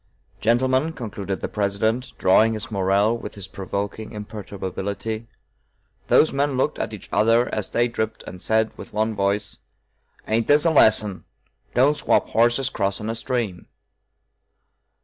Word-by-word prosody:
"Gentlemen," 130 +7 +2
concluded 105 - -5
the - - -2
President, 110 +4 -1
drawing 110 +4 +4
his 110 +1 -6
moral 100 +3 +2
with - - -8
his 100 -2 -7
provoking 100 +3 -5
imperturbability, 105 +1 -5 0.8
"those 155 - +4
men 140 -1 0
looked 130 - 0
at - - -2
each - - -9
other, 115 +3 +3
as 105 -3 -2
they 120 +1 +2
dripped, 110 -2 -3
and 90 - -9
said 110 +1 +1
with - - -8
the - - -17
one 110 +1 +1
voice: 100 0 -1 0.7
'Ain't 115 +1 +1
this 145 +2 +5
a 165 - +4
lesson? 110 -8 +3 0.5
Don't 140 +4 +4
swap - - +2
horses 120 +4 +2
crossing 100 +2 -1
a - - -2
stream!'" 115 -6 -3
110 Hz, 145 wpm, -23 LUFS, 100-120 Hz, 0.8 s, this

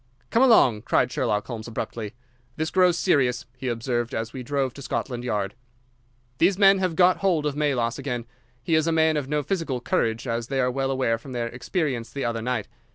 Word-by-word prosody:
"Come 230 - +3
along!" 130 - +5
cried 125 +2 +1
Sherlock 105 0 0
Holmes, 115 -2 -6
abruptly. 115 -1 -5 0.4
"This 160 0 -2
grows 180 -2 +4
serious," 130 -9 +2
he 130 +1 -6
observed, 120 0 -2
as 115 +1 -3
we 130 - -5
drove 135 0 -1
to 140 - -10
Scotland 125 -2 -3
Yard. 105 -5 -2 0.9
"These 185 +3 +4
men 195 -1 +6
have 185 -3 0
got 180 +1 +5
hold 175 -6 +1
of 145 -2 -1
Melas 130 -6 0
again. 125 -4 -3 0.4
He 165 - -1
is 160 0 +3
a - - +2
man 160 -1 +3
of 140 -3 -2
no 150 0 0
physical 160 -6 -2
courage, 115 -1 0
as 115 -1 -2
they 135 0 -1
are 125 -1 +2
well 135 +1 -1
aware 130 -4 0
from 130 +2 -10
their 120 -1 -2
experience 125 -1 -2
the 140 +1 -3
other 115 -1 -1
night. 115 -2 -2
130 Hz, 205 wpm, -25 LUFS, 115-155 Hz, 0.9 s, men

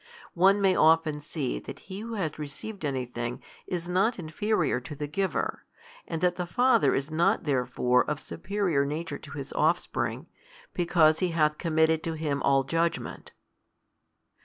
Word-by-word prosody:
One 195 +3 +4
may 190 -1 +4
often 160 -2 +4
see - - -3
that - - -10
he 190 +1 -8
who 225 +1 -5
has 160 -7 -3
received 155 +8 -6
anything 125 -4 -3 0.3
is 175 -2 -3
not 195 +6 +2
inferior 175 - 0
to 145 +4 -8
the 150 +1 -4
giver, 185 +4 -2 0.4
and 165 -1 -4
that 180 -1 +2
the 180 -1 -3
Father 245 - +3
is 140 +3 -2
not 175 +7 +2
therefore 125 -2 +1
of 150 -1 -2
Superior 190 -8 -1
Nature 155 +4 -4
to - - -12
His 140 -1 -6
offspring, 165 +3 0 0.5
because 165 -3 +3
He 185 - +2
hath 155 -3 +1
committed 160 -1 +2
to 165 - -1
Him 150 -3 -2
all 135 -1 +3
judgment. 165 +4 -2
160 Hz, 155 wpm, -28 LUFS, 145-180 Hz, 0.5 s, One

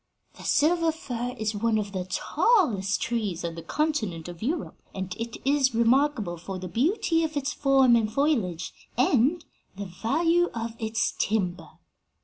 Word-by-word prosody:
The - - -11
silver 330 +2 +3
fir 245 -6 -5
is 220 -1 -1
one 220 +1 +1
of 205 -1 -3
the 185 -2 -3
tallest 200 - +1
trees 210 -8 -2
on 170 - -3
the 165 - -7
continent 215 - -2
of 175 -1 -9
Europe, 295 +7 -3
and 190 -1 -4
it 230 0 -4
is 275 -3 +3
remarkable 235 -5 +2
for 185 +3 -6
the 185 0 -6
beauty 330 - +1
of 310 -2 -2
its 285 0 -1
form 270 -3 +4
and 220 -2 +1
foliage 220 - 0 0.2
and 275 +5 +2 0.3
the 200 +1 -5
value 330 - +1
of 230 0 -3
its 220 -1 0
timber." 190 -4 -1
230 Hz, 155 wpm, -26 LUFS, 195-290 Hz, 0.3 s, form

